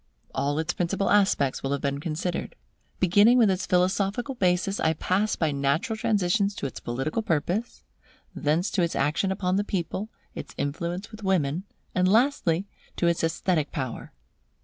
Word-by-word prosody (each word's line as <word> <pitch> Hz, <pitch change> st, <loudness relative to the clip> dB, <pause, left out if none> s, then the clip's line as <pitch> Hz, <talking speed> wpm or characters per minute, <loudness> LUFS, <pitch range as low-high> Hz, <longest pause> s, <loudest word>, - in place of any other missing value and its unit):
All 145 Hz, +1 st, 0 dB
its 160 Hz, +2 st, -1 dB
principal 195 Hz, +3 st, 0 dB
aspects 195 Hz, -10 st, +3 dB
will 135 Hz, +1 st, -1 dB
have 140 Hz, -, -2 dB
been 140 Hz, 0 st, -1 dB
considered. 165 Hz, +3 st, -3 dB, 0.4 s
Beginning 205 Hz, +7 st, +5 dB
with 225 Hz, -5 st, +5 dB
its 185 Hz, 0 st, -2 dB
philosophical 195 Hz, +8 st, +1 dB
basis, 185 Hz, -2 st, +1 dB
I 160 Hz, -, +2 dB
pass 195 Hz, +6 st, 0 dB
by 160 Hz, -3 st, 0 dB
natural 140 Hz, +9 st, 0 dB
transitions 205 Hz, -3 st, +1 dB
to -, -, -4 dB
its 135 Hz, -, -5 dB
political 135 Hz, -, -2 dB
purpose; 195 Hz, +4 st, -1 dB, 0.5 s
thence 160 Hz, +4 st, 0 dB
to 190 Hz, -, +1 dB
its 170 Hz, -1 st, 0 dB
action 155 Hz, +7 st, +1 dB
upon 185 Hz, -1 st, 0 dB
the 205 Hz, -, +1 dB
people, 195 Hz, +2 st, -3 dB, 0.2 s
its -, -, -8 dB
influence 170 Hz, +8 st, -3 dB
with 215 Hz, 0 st, -10 dB
women, 180 Hz, -3 st, 0 dB, 0.3 s
and 185 Hz, 0 st, +2 dB
lastly, 210 Hz, -, +2 dB, 0.3 s
to -, -, 0 dB
its 170 Hz, -1 st, +2 dB
esthetic 165 Hz, -1 st, 0 dB
power. 130 Hz, -4 st, -5 dB
180 Hz, 160 wpm, -26 LUFS, 155-200 Hz, 0.5 s, Beginning